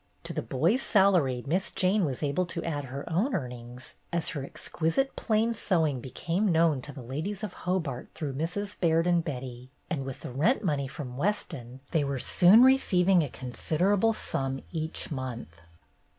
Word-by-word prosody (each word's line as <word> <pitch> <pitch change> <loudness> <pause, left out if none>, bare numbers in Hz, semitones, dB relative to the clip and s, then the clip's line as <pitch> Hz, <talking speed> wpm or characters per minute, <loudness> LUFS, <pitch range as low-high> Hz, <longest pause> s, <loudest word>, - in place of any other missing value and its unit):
To - - -6
the - - -2
boys' 170 - +1
salary 180 - +3
Miss 175 +7 0
Jane 190 +1 +2
was 135 0 -3
able 150 +5 0
to 170 0 -4
add 145 -4 -3
her 135 +2 -7
own 195 - +1
earnings 125 -4 -6 0.2
as 170 -2 -1
her 145 -4 -4
exquisite 165 - -1
plain 225 +1 +1
sew 180 -6 +1
ing 140 -4 -1
became 175 - -1
known 160 -4 +3
to 150 - -7
the 135 -3 -9
ladies 160 - -4
of 205 -4 -4
Hobart 165 -9 -3
through 145 -4 -3
Mrs. 180 +8 -3
Baird 165 -1 +3
and 175 -1 +3
Betty, 130 -4 -6 0.2
and 145 -6 -1
with 135 -1 -7
the - - -6
rent 165 - +2
money 145 -7 0
from 130 -3 -7
Weston 135 - -3
they 160 -3 +2
were 140 -1 -2
soon 185 - +6
re 265 +1 +7
ceiving 180 -5 +3
a 145 - -3
considerable 180 - 0
sum 135 -9 -1
each 160 -1 -4
month. 120 - -6
160 Hz, 180 wpm, -28 LUFS, 135-185 Hz, 0.2 s, re